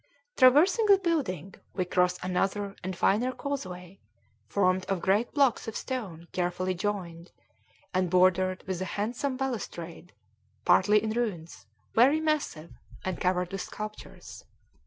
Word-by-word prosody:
Traversing 315 - +5
the 400 -1 +7
building, 275 - -2 0.2
we 185 - 0
cross 180 0 +2
another 195 +2 -1
and 185 -1 -4
finer 230 +9 +2
causeway, 195 -9 -6 0.5
formed 185 - +2
of 195 -2 -1
great 200 +6 +1
blocks 275 -6 +2
of 225 - -5
stone 190 -11 -5
carefully 180 +1 -1
joined, 180 -3 -4 0.6
and 185 -1 +1
bordered 185 +1 +3
with 185 -2 -3
a - - -1
handsome 245 +6 -2
balustrade, 180 -10 -5 0.5
partly 205 +4 +5
in 220 - -1
ruins, 180 - -4 0.3
very 270 +7 +5
massive, 300 - -2 0.3
and 185 -2 -3
covered 180 -1 0
with 195 -1 -3
sculptures. 215 0 -8
195 Hz, 130 wpm, -28 LUFS, 180-245 Hz, 0.6 s, the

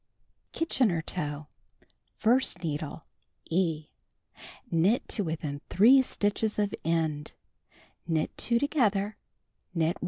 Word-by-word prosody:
Kitchener 230 - +1
Toe: 150 -4 -4 0.7
1st 245 -2 +2
needle 155 -1 -4 0.2
— - - -28
(E) 160 -3 0 0.8
Knit 180 +8 +2
to 210 - 0
within 150 -4 -4
3 245 +8 +7
stitches 210 -3 -1
of 205 -1 0
end, 160 -2 -1 0.7
knit 160 -2 0
2 235 - +1
together, 215 -7 +1 0.6
knit 165 +1 +1
1. - - -28
175 Hz, 105 wpm, -29 LUFS, 160-220 Hz, 0.8 s, 3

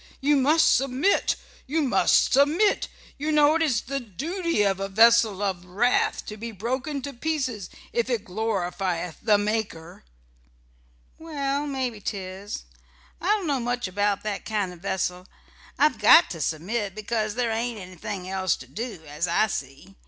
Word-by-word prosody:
You 290 +2 +3
must 295 +4 +4
submit; 270 +9 +1 0.3
you 310 +3 +1
must 195 -9 +3
submit. 305 +10 +3 0.3
You 305 +2 -1
know 300 0 +5
it 325 - +1
is 270 -9 +2
the 275 +2 -3
duty 310 - -2
of 195 -1 +1
a 195 - -2
vessel 225 -1 +5
of 190 -3 -2
wrath 200 +8 +1
to 210 - -7
be 230 +2 -6
broken 260 +7 -3
to 280 0 -5
pieces 255 - -2 0.2
if 235 +1 0
it 230 -4 -1
glorifieth 180 -4 -2
the 210 -3 +4
Maker." 205 - -3 1.2
"Well, 285 -2 -2
mebbe 255 -6 -3
'tis. 195 0 -5 0.6
I 345 - -3
don't 415 -2 +2
know 285 -4 0
much 245 -2 -2
about 205 +1 0
that 210 -2 -3
kind 205 -4 -2
o' - - -12
vessel. 180 0 -3 0.5
I've 285 -6 +3
got 210 -4 +7
to 165 -3 -5
submit 195 +7 -2
because 215 0 -2
there 240 -2 0
ain't 230 +1 -2
anything 185 +1 -7
else 185 -2 0
to 130 - -12
do, 205 - -6
as 150 +4 -3
I 170 +5 +3
see. 140 0 -6
220 Hz, 160 wpm, -25 LUFS, 190-270 Hz, 1.2 s, got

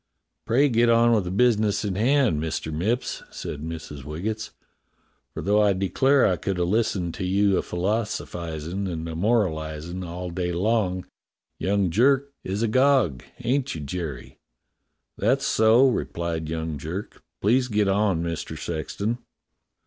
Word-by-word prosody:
"Pray 130 +6 +4
get 120 -2 +3
on 115 0 +5
with 105 -5 +2
the - - -3
business 110 0 +2
in 100 - -1
hand, 120 - +2
Mister 80 0 -3
IVIipps," 105 +11 -1
said 75 - -6
Mrs. 80 -3 -7
Waggetts, 105 +9 -4 0.8
"for - - -6
though 105 +2 +3
I 105 -1 +4
declare 130 +9 +3
I 90 - +2
could 95 -2 -2
a 90 - +1
listen 95 -2 0
to 95 - -6
you 100 +2 +2
a - - +2
philosphizin' 90 -3 -3
and 80 -1 -4
a 80 - -5
moralizin' 85 -4 -1
all 90 +1 -5
day 90 0 -2
long, 95 0 0 0.5
young 100 -2 +1
Jerk 135 +7 +3
is 100 +4 -2
all 115 - +1
agog. 130 - +3 0.2
Ain't 135 -1 0
you, 80 - -5
Jerry 75 -3 -6
.'^ - - -55 0.4
" - - -53
"That's - - +2
so," 110 +4 +5
replied 85 -9 -2
young 80 -2 -3
Jerk. 85 +8 -6 0.2
"Please 125 +5 +3
get 105 -3 +1
on, 95 -4 +2
Mister 85 -2 -4
Sexton." 100 +9 -3
95 Hz, 155 wpm, -25 LUFS, 85-115 Hz, 0.8 s, on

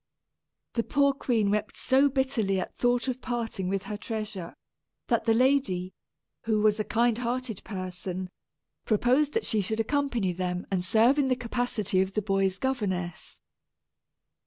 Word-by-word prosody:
The 230 - +1
poor 280 +1 +3
queen 230 -7 +1
wept 210 0 -1
so 270 +2 +4
bitterly 255 -8 0
at - - -5
thought 245 +1 +1
of 255 0 -2
parting 230 -6 -2
with 195 0 -1
her 210 - -5
treasure, 210 -5 -5 0.5
that - - +2
the 225 - +4
lady, 225 -8 +2 0.5
who 220 -1 +2
was 215 0 +3
a - - +1
kind 235 +1 +1
hearted 245 -3 -3
person, 185 -1 -5 0.5
proposed 255 - +2
she 215 - +1
should 220 +3 -2
accompany 240 -6 0
them 180 0 -3
and 185 -2 0
serve 230 +9 +4
in 275 - +3
the 255 - +2
capacity 240 -5 0
of 190 +1 -2
the 215 - +2
boy's 195 -2 +1
governess. 190 -9 -3
220 Hz, 150 wpm, -28 LUFS, 190-250 Hz, 0.5 s, so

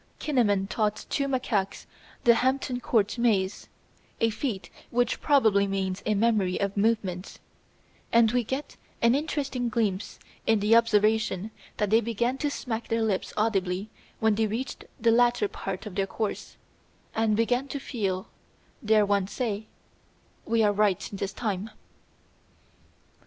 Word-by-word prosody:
Kinnaman 210 -10 +1
taught 210 0 -1
two 275 -1 0
macaques 220 -7 -1 0.4
the 235 - +7
Hampton 260 +1 0
Court 225 -2 +1
Maze, 205 -5 +1 0.5
a 230 0 +2
feat 220 -3 -4 0.2
which 245 0 0
probably 220 -9 +4
means 195 0 -2
a 215 - +2
memory 205 -4 +2
of 200 -1 -1
movements, 200 -4 0 0.7
and 230 -1 +5
we 245 0 +1
get 265 +6 -5 0.3
an 235 +1 +6
interesting 280 -4 -1
glimpse 215 -5 -1 0.3
in 225 -1 +4
his 210 +2 +3
observation 220 -3 +3 0.3
that 210 -1 0
they 225 +1 +5
began 235 +3 -1
to 295 - 0
smack 235 -5 -4
their 230 -1 0
lips 205 -4 -1
audibly 200 -2 0 0.3
when 220 -1 +3
they 220 +1 +1
reached 235 +6 -4
the 230 0 +4
latter 240 -2 +3
part 195 0 -6
of 210 - -7
their 195 +1 0
course, 215 +1 -4 0.6
and 220 -1 +1
began 245 +4 +1
to 280 - -4
feel, 195 -9 -3 0.6
dare 215 -1 +4
one 200 -2 +1
say, 215 -2 -3 0.8
"We 225 0 +3
are 205 -1 +3
right 205 -3 +1
this 195 0 -3
time." 205 -1 -3
220 Hz, 140 wpm, -27 LUFS, 200-235 Hz, 0.8 s, the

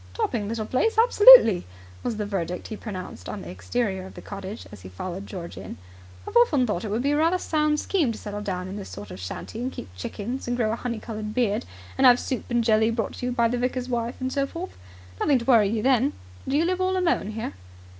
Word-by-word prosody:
"Topping 240 - -1
little 225 -1 -3
place! 430 - 0
Absolutely!" 445 - +8 0.4
was 230 - -3
the 210 - -2
verdict 180 -3 -3
he 220 - -4
pronounced 185 - -7
on - - -6
the 85 - -8
exterior 190 - -2
of - - -14
the - - -9
cottage 200 +2 -7
as 105 - -11
he 95 - -10
followed 185 - -6
George 175 -4 -7
in. 95 - -8 0.5
"I've - - -7
often 250 +2 +4
thought 210 -6 -2
it 215 - -4
would 220 +4 -1
be 285 - +2
a 290 - +2
rather 330 +4 +3
sound 305 -3 +1
scheme 320 -10 +1
to 225 - -6
settle 205 0 -6
down 185 -3 -3
in 190 +2 -6
this 200 - -7
sort 100 -1 -9
of 90 - -8
shanty 90 - -6
and 255 +2 -2
keep 90 - -9
chickens 220 - -5
and 245 0 -1
grow 220 -3 +1
a - - 0
honey 235 -1 -4
coloured 215 -1 -6
beard, 225 - +1 0.3
and 265 - +7
have 245 0 +7
soup 260 - -3
and 240 -1 +1
jelly 220 0 +3
brought 225 -2 -2
to 250 - -3
you - - -1
by 235 -1 +2
the 245 +1 -1
vicar's 250 0 -2
wife 235 0 -2
and 260 0 -2
so 275 -1 0
forth. 345 +6 -7 0.4
Nothing 280 - +3
to 235 - -5
worry 225 -6 +5
you 215 0 -1
then. 265 +1 +3 0.3
Do 275 - +1
you 325 - +3
live 365 +1 0
all 375 0 +1
alone 340 - 0
here?" 220 +1 -4
230 Hz, 245 wpm, -25 LUFS, 200-260 Hz, 0.5 s, Absolutely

